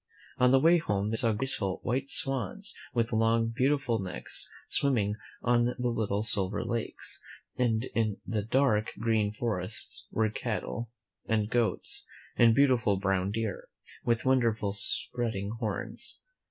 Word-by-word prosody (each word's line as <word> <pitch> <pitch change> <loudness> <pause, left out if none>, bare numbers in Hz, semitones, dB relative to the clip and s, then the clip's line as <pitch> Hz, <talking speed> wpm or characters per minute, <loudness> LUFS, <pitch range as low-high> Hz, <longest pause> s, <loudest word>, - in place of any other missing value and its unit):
On 125 0 +6
the 135 - +6
way 170 +4 +5
home 105 -7 -1
they - - 0
saw 115 0 +3
graceful, 105 -5 -2
white 130 +2 -1
swans, 140 - -2 0.2
with 115 -1 0
long, 115 +1 +3
beautiful 130 -1 +1
necks, 95 -1 -2 0.2
swim 140 -2 +2
ming 105 -2 0 0.3
on 120 0 +3
the 125 - -1 0.2
little 105 -2 -1
silver 100 -1 0
lakes, 115 -1 -3 0.4
and 115 -2 +1
in 110 -3 0
the 110 -2 -1
dark, 110 -1 +2
green 110 -2 +1
forests 110 -2 -1
were 110 -1 +1
cattle, 115 +1 -3 0.4
and 110 0 0
goats, 125 +7 0 0.3
and 115 -2 +5
beautiful 125 -8 +4
brown 95 -1 0
deer, 110 -1 -3 0.4
with 115 0 +1
wonderful 115 -6 +2
spreading 105 0 0
horns. 110 -5 -3
115 Hz, 140 wpm, -29 LUFS, 105-125 Hz, 0.4 s, On